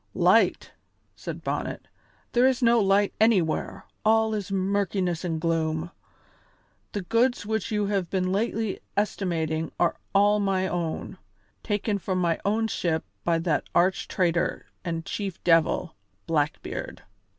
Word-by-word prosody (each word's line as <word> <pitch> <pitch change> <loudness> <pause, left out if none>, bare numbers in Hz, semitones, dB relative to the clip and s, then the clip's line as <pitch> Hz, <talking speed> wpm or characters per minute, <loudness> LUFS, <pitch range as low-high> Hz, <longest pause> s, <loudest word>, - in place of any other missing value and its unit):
"Light!" - - +3 0.4
said - - -7
Bonnet; - - -3 0.4
"there 245 +2 +4
is 260 -1 +1
no 235 0 +5
light 200 0 +3
anywhere; 195 -8 +2 0.2
all 220 0 +3
is 205 -2 -3
murkiness 190 -2 0
and 165 -3 -2
gloom. 165 0 -1 1.0
The 205 - -3
goods 230 +3 +1
which 220 -1 -2
you 210 -2 0
have 195 -4 -1
been 185 -1 0
lately 215 0 -1 0.2
estimating 165 -6 -1
are 175 - +2 0.2
all 205 +1 +5
my 190 -2 +1
own, 175 +1 -3 0.4
taken 205 -1 -1
from 185 0 -2
my 170 -2 +1
own 220 +2 +1
ship 165 -6 -1 0.2
by 170 -1 +2
that 155 -4 +1
arch 180 +1 +2
traitor 175 -2 0 0.2
and 165 -2 -3
chief 195 -4 -4
devil, 165 0 +2 0.3
Blackbeard. 155 -2 -2
190 Hz, 130 wpm, -26 LUFS, 170-210 Hz, 1.0 s, no